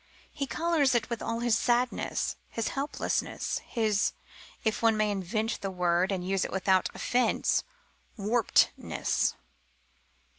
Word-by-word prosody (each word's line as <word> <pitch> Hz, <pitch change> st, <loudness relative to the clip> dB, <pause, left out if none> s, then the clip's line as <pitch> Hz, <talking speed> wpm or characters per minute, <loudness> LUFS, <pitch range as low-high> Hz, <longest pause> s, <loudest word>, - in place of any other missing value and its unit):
He 275 Hz, -, -3 dB
colours 310 Hz, -6 st, +2 dB
it 235 Hz, 0 st, 0 dB
with 235 Hz, -, -2 dB
all 230 Hz, 0 st, -2 dB
his 240 Hz, -2 st, +3 dB
sadness, 245 Hz, +2 st, 0 dB
his 230 Hz, -, -2 dB
helplessness, 280 Hz, +2 st, -2 dB
his 215 Hz, -3 st, 0 dB, 0.5 s
(if 220 Hz, -1 st, 0 dB
one 225 Hz, -1 st, +4 dB
may 215 Hz, -1 st, +2 dB
invent 210 Hz, +4 st, -2 dB
the 195 Hz, -, -2 dB
word 180 Hz, 0 st, +1 dB
and 180 Hz, -2 st, -2 dB
use 195 Hz, 0 st, +1 dB
it -, -, -4 dB
without 190 Hz, 0 st, +2 dB
offence) 250 Hz, 0 st, +1 dB, 0.5 s
warpedness. 225 Hz, +3 st, +1 dB
220 Hz, 125 wpm, -29 LUFS, 195-240 Hz, 0.5 s, one